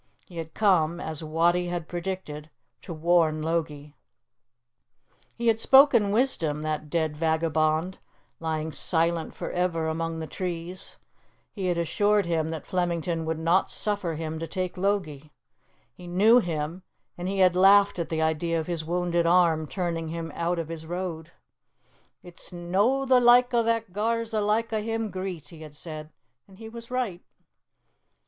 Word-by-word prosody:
He 175 - -13
had 160 -1 -6
come, 175 -5 +2
as 160 -2 -5
Wattie 170 +3 +1
had 175 -2 -4
predicted, 175 -4 -5 0.3
to - - -9
warn 160 -1 +2
Logie. 150 -3 -3 1.4
He 235 - -5
had 225 -1 +3
spoken 265 -5 +6
wisdom, 170 - 0
that 155 -1 -3
dead 160 -1 0
vagabond, 160 +2 0 0.4
lying 160 -1 -2
silent 165 +1 0
for - - -5
ever 175 -2 0
among 165 +1 -2
the 160 - -4
trees; 175 +1 -5 0.5
he 195 -3 -4
had 175 -1 0
assured 205 +4 +2
him 160 -2 0
that 160 -2 -5
Flemington 170 -3 -1
would 160 0 -2
not 165 +4 +2
suffer 200 -6 -2
him 160 0 -4
to 165 - -4
take 185 0 -3
Logie. 180 -7 -2 0.6
He 180 +5 -12
knew 210 +7 +5
him, 165 -2 -3 0.3
and 175 +1 -5
he 195 +1 -2
had 185 -2 +4
laughed 200 +1 +5
at 170 - -3
the 160 -1 0
idea 165 +1 0
of 160 - -3
his 170 -2 -3
wounded 175 0 0
arm 165 -3 +3
turning 170 -3 -3
him 165 0 -5
out 170 +1 -1
of 165 -1 -4
his 160 -1 -7
road. 170 -2 -4 0.9
"It's 175 -1 -12
no 195 +10 +1
the 255 -1 +5
like 245 +1 +5
o' 235 - +4
that 230 0 0
that 180 - -26
gars 230 +2 -1
the 215 -1 0
like 220 +2 0
o' 215 - 0
him 225 -1 -3
greet," 185 -3 -5
he 165 - -13
had 155 -2 -11
said; 155 0 -8 0.4
and 190 -1 -17
he 220 +1 -9
was 230 0 -10
right. 245 -8 -2
170 Hz, 165 wpm, -26 LUFS, 160-195 Hz, 1.4 s, spoken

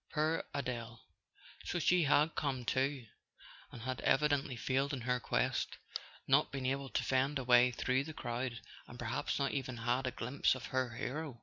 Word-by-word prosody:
Poor 155 +1 +1
Adele! 120 -4 -4 0.6
So - - -2
she 175 +1 +4
had 150 +3 +4
come 130 -4 -2
too—and 130 -2 -4
had 130 0 -3
evi¬ 150 +3 +3
dently 140 -3 0
failed 135 +4 0
in 130 - -3
her 125 +1 0
quest, - - 0 0.5
not - - +4
been 135 -1 -4
able 135 +1 -1
to - - 0
fend 135 +2 +1
a 135 - -3
way 125 0 +6
through 130 +2 0
the 160 - -6
crowd, 120 -2 -3 0.3
and 120 - -10
perhaps 120 0 -2
not 140 -1 0
even 130 -3 -3
had 120 +3 0
a - - 0
glimpse 125 +3 +1
of 130 - -7
her 130 -3 0
hero. 140 0 -4
130 Hz, 180 wpm, -35 LUFS, 125-140 Hz, 0.6 s, way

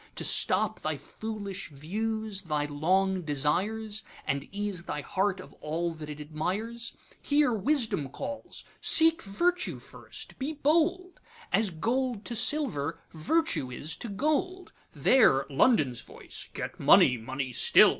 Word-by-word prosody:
To - - -3
stop - - +2
thy - - -2
foolish 205 -3 -6
views, 210 +7 -3
thy 150 -5 -1
long 185 +6 +1
desires, 195 +9 0 0.2
And 140 0 -1
ease 200 -3 -3
thy 150 - -3
heart 195 +5 -1
of - - -11
all 165 +3 -2
that 155 -1 -9
it 150 0 -7
admires? 190 +11 -3 0.3
Here 290 -3 +3
Wisdom 220 - 0
calls, 280 - -7 0.2
'Seek 325 0 +6
Virtue 350 - 0
first, - - -10
be 280 +4 -2
bold! 335 +5 +1 0.3
As 220 -2 +3
gold 235 +6 -1
to 235 - -3
silver, 215 - +1
Virtue 160 - 0
is 145 +6 -3
to 235 - -5
gold.'There 290 - +1
London's 140 - +3
voice, - - -7
'Get - - -6
money, 125 - +6
money 130 +2 -4
still! - - +7
200 Hz, 130 wpm, -29 LUFS, 155-250 Hz, 0.3 s, still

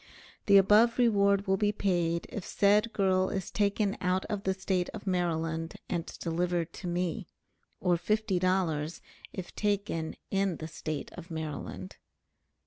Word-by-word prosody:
The 200 -1 +8
above 210 +4 +5
reward 200 -4 +3
will 190 -1 +2
be 205 +1 +2
paid 175 -5 0
if 205 - -5
said 210 +5 +3
girl 190 -2 +2
is 195 -2 -3
taken 200 0 +1
out 185 +1 +1
of 205 -1 -3
the 190 - +2
State 190 -1 -1
of 210 - -8
Maryland 165 -3 -1
and 170 -2 -2
delivered 170 0 -1
to 180 - -7
me; 180 +2 -2 0.5
or 180 -2 +2
fifty 210 0 0
dollars 175 -4 0 0.3
if 185 -2 -7
taken 200 -6 -1 0.2
in 195 -3 +1
the 155 - -6
State 155 -1 -5
of 170 - -10
Maryland. 150 - -6
185 Hz, 145 wpm, -30 LUFS, 170-200 Hz, 0.5 s, The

